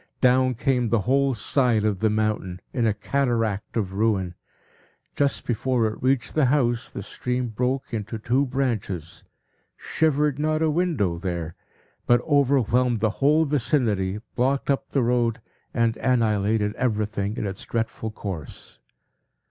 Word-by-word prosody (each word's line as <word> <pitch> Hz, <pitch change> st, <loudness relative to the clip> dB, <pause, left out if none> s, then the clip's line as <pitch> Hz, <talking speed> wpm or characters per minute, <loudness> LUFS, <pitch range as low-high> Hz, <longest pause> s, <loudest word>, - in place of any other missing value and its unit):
Down 130 Hz, 0 st, +3 dB
came 125 Hz, -1 st, +1 dB
the 110 Hz, -1 st, +2 dB
whole 135 Hz, +3 st, +2 dB
side 115 Hz, -1 st, +2 dB
of 105 Hz, -3 st, 0 dB
the 110 Hz, -, +2 dB
mountain, 105 Hz, -4 st, -1 dB
in 120 Hz, -3 st, +1 dB
a 110 Hz, -, +2 dB
cataract 115 Hz, -3 st, -1 dB
of 95 Hz, -4 st, -2 dB
ruin. 100 Hz, -4 st, 0 dB, 0.8 s
Just 140 Hz, -1 st, 0 dB
before 125 Hz, 0 st, 0 dB
it 110 Hz, 0 st, -3 dB
reached 130 Hz, -1 st, +1 dB
the 155 Hz, -3 st, +3 dB
house, 125 Hz, -3 st, +1 dB
the 100 Hz, -, -7 dB
stream 125 Hz, +4 st, -3 dB
broke 125 Hz, +4 st, -2 dB
into 110 Hz, 0 st, -3 dB
two 125 Hz, +6 st, +1 dB
branches, 110 Hz, -, -3 dB, 0.5 s
shivered 150 Hz, -2 st, +1 dB
not 155 Hz, +1 st, +1 dB
a 155 Hz, -, +2 dB
window 150 Hz, -, 0 dB
there, 85 Hz, -3 st, -3 dB, 0.5 s
but 120 Hz, 0 st, +5 dB
overwhelmed 125 Hz, -5 st, +2 dB
the 110 Hz, 0 st, +1 dB
whole 150 Hz, +3 st, +4 dB
vicinity, 120 Hz, -9 st, 0 dB, 0.2 s
blocked 135 Hz, +3 st, +1 dB
up 135 Hz, -, -2 dB
the 135 Hz, -, +1 dB
road, 120 Hz, -1 st, +1 dB, 0.3 s
and 115 Hz, -1 st, +1 dB
annihilated 110 Hz, -4 st, +1 dB
everything 105 Hz, -3 st, -1 dB
in -, -, -2 dB
its 95 Hz, -1 st, -5 dB
dreadful 115 Hz, -1 st, -3 dB
course. 95 Hz, -8 st, -8 dB
120 Hz, 140 wpm, -24 LUFS, 105-135 Hz, 0.8 s, but